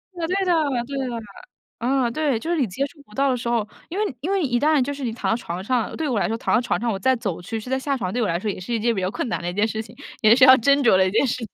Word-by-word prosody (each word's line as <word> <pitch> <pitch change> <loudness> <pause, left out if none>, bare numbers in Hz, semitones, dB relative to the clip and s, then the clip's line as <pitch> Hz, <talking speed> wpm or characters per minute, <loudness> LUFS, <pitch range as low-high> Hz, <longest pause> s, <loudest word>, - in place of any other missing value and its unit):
对 330 -2 -3 0.2
的 355 - +3 0.3
对 275 +1 -5
的 260 - -2
对。 235 -1 -4 0.6
呃， 250 0 +1
对， 285 -3 0
就 330 +8 -4
是 345 - +1
你 245 - +1
接 260 +9 -2
触 285 +1 -13
不 210 - -20
到 275 0 +2
的 - - +1
时 235 0 -4
候 225 -3 0 0.2
因 360 - -5
为 415 -11 -1
因 360 +6 -2
为 390 -2 +1
一 240 -3 +1
旦 305 0 +3
就 285 +3 -1
是 280 -1 -7
你 235 - -1
躺 225 - -2
到 - - +3
床 185 -5 -5
上， 245 0 -1
对 320 -2 -2
我 235 -6 0
来 - - +1
说， 225 +1 -2
躺 - - -1
到 - - +4
床 240 - -1
上 235 0 -1
我 195 - -2
再 260 +6 +3
走 195 -7 -4
去， 225 +5 -4
去 250 - -9
再 265 - +1
下 275 0 -1
床， 185 -5 -3
对 245 - 0
我 215 - +1
来 170 - 0
说 210 +3 -3
也 190 - -4
是 185 +6 -7
一 225 - 0
件 235 +1 +1
比 190 - -2
较 185 - 0
困 240 - -3
难 - - -2
的 175 - -3
一 - - -5
件 210 +3 +1
事 220 0 -3
情， 225 - -13 0.3
也 220 +1 +6
是 260 - +4
要 260 0 +9
斟 280 +4 +4
酌 220 - +5
的 190 0 +4
一 - - -2
件 220 - +3
事 255 - -1
情。 230 - -6
240 Hz, 380 characters per minute, -23 LUFS, 215-275 Hz, 0.6 s, 要